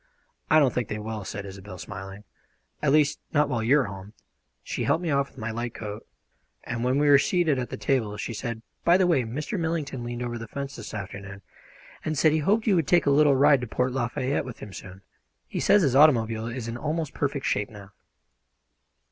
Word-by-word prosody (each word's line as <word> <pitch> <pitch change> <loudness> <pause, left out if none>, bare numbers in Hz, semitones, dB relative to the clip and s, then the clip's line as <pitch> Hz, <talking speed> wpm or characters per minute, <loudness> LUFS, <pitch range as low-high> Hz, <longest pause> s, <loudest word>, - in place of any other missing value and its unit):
"I 155 - +6
don't 140 -5 +4
think 125 -4 -1
they 105 - -4
will," 110 0 -5
said 100 +1 -6
Isobel, 95 -1 -9
smiling. 100 +1 -8 0.6
"At 150 - +2
least 150 0 +3
not 150 -1 +3
while 120 -4 -1
you 125 +6 +4
are - - 0
home." 100 0 -8 0.5
She - - -3
helped 170 - +1
me 165 - -1
off 140 0 +2
with - - -25
my 110 0 -4
light 120 +1 -4
coat, 105 -1 -7 0.6
and 120 -1 -4
when 130 +2 +2
we 145 +1 +3
were 140 -1 +7
seated 160 -3 +2
at 125 -3 -3
the - - -5
table 105 -2 0
she 110 +3 -4
said: 115 0 -5 0.2
"By 170 +1 +5
the 190 - +3
way, 170 -7 +3
Mr. 145 - -4
Millington 160 -6 -2
leaned 120 0 -4
over 120 -1 -4
the 115 - -7
fence 140 +3 -6
this 110 -1 -8
afternoon, 100 -1 -7 0.6
and 155 -1 -2
said 155 +3 +5
he 155 - +2
hoped 210 +9 +2
you 210 -5 +4
would 160 -4 +1
take 175 +2 +4
a 140 - +4
little 145 0 +5
ride 140 0 +5
to 125 - -4
Port 125 +3 0
Lafayette 130 +2 -1
with 125 -3 -8
him 105 - -10
soon. 95 0 -10 0.4
He - - -4
says 205 -2 +4
his 135 -4 +2
automobile 115 -6 +4
is 120 -1 -5
in 115 +1 -4
almost 155 +3 -2
perfect 140 -1 -2
shape 105 0 0
now." 100 -2 -12
125 Hz, 220 wpm, -26 LUFS, 110-145 Hz, 0.6 s, were